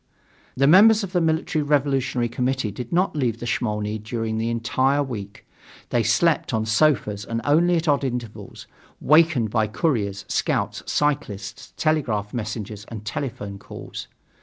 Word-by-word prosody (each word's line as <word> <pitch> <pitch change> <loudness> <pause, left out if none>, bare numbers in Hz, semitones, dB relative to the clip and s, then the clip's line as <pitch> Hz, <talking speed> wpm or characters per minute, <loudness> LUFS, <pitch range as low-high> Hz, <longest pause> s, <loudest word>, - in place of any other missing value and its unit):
The 135 - +4
members 210 +8 +7
of 190 - -5
the 180 -2 +1
Military 160 0 0
Revolutionary 135 -4 +1
Committee 125 -1 -1
did 120 +4 -7
not 180 0 +1
leave 120 -6 -1
the 120 - -6
Smolny 105 -2 -2
during 110 0 -3
the 115 +1 -1
entire 130 +4 +1
week. 105 -7 -7 0.4
They 120 - +2
slept 120 +4 +2
on 110 0 0
sofas 110 -4 +2
and 115 +2 -3
only 170 +5 +3
at 165 0 -1
odd 145 -1 +2
intervals, 120 -4 -5 0.3
wakened 150 -7 +4
by 110 -2 +1
couriers, 105 - -1
scouts, - - -1
cyclists, 135 -5 -2
telegraph 120 -10 0
messengers 110 -2 -5
and 110 -2 -8
telephone 105 -4 -5
calls. - - -9
120 Hz, 145 wpm, -23 LUFS, 110-150 Hz, 0.4 s, members